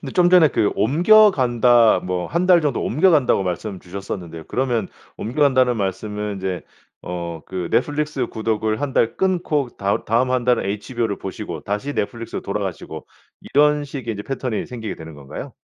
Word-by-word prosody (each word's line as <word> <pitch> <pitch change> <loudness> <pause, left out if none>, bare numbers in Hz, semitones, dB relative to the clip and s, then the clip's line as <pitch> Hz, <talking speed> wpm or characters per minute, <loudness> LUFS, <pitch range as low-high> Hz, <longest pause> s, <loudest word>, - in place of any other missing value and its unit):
근데 135 - -7
좀 180 -1 +4
전에 180 -4 +7
그 105 - +1
"옮겨간다." 125 - +5
뭐 90 -1 -2
"1 170 +3 -1
달 180 -2 +6
정도 145 -5 -1
옮겨간다."고 150 - +3
말씀 95 +2 -4
주셨었는데요. 90 -3 -7
그러면 120 -6 -1 0.3
"옮겨간다."는 130 0 +2
말씀은 105 +1 -3
이제 95 -1 -3 0.4
어 85 -2 -5
그 90 -2 -4
넷플릭스 145 -1 0
구독을 110 -1 -2
1 145 -2 -2
달 115 - +2
끊고 175 -7 0
다 100 0 -1
다음 120 +4 +2
1 130 -1 0
달은 125 0 +2
HBO를 105 +2 -3
보시고 95 -4 -6
다시 105 - -3
넷플릭스로 115 +3 -3
돌아가시고 100 -5 -5 0.5
이런 150 +1 +4
식의 135 -5 -5
이제 100 - -6
패턴이 125 -4 -3
생기게 115 -4 -6
되는 80 -1 -10
건가요? 70 -2 -9
115 Hz, 355 characters per minute, -21 LUFS, 100-140 Hz, 0.5 s, 전에